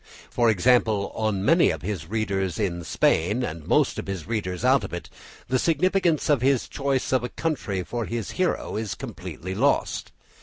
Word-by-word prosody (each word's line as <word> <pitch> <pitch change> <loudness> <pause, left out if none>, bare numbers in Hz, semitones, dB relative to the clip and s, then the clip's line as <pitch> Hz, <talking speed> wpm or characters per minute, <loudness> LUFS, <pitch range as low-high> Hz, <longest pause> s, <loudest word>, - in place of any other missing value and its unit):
For 120 -1 +3
example, 110 -1 +3
on 105 -3 -1
many 165 +5 +5
of 80 -3 -3
his 90 -5 -4
readers 100 -4 -1
in 90 -5 -1
Spain, 90 +8 +1
and 80 -8 -5
most - - +2
of - - -6
his 95 -5 -4
readers 90 -6 -3
out - - +4
of - - -5
it, - - -8 0.4
the 130 +1 +1
significance 175 0 +2
of 145 -5 +3
his 135 -1 +2
choice 135 -2 -1
of 130 -2 +2
a 125 - -3
country 120 - -2
for 120 +5 -3
his 115 -3 -4
hero 185 - -1
is 110 -3 -3
completely 95 +2 -7
lost. 135 +9 0
110 Hz, 180 wpm, -25 LUFS, 95-130 Hz, 0.4 s, many